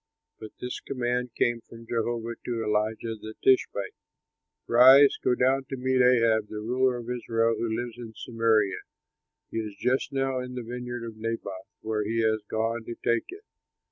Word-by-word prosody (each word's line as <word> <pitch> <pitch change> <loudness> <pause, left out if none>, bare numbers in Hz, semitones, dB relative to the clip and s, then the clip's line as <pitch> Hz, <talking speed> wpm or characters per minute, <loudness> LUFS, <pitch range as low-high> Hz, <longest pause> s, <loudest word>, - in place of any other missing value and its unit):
But 110 -1 -9
this 125 0 -4
command 125 -2 -2
came 120 -1 +1
from 115 0 -13
Jehovah 115 0 -2
to 115 -2 -2
Elijah, 110 +1 -1
the 110 0 -9
Tishbite, 130 -6 +2 0.7
"Rise, 130 +4 +7
go 125 - +3
down 135 +2 +2
to 135 0 -6
meet 130 0 +2
Ahab, 115 -3 +4
the 110 - -9
ruler 125 +3 +1
of 120 -1 -8
Israel, 115 -2 0
who 115 - -2
lives 120 0 -5
in 115 -2 -9
Samaria; 115 -4 +1 0.7
he - - -4
is 105 -2 -5
just 125 +4 0
now 135 -1 0
in 125 0 -6
the 125 - -4
vineyard 120 0 -5
of 115 -1 -8
Naboth, 110 -4 -5
where 110 -1 -1
he 115 +2 -1
has 110 -1 +1
gone 115 +1 -1
to 120 - -6
take 115 0 +1
it. 395 +4 -10
115 Hz, 175 wpm, -27 LUFS, 110-125 Hz, 0.7 s, Rise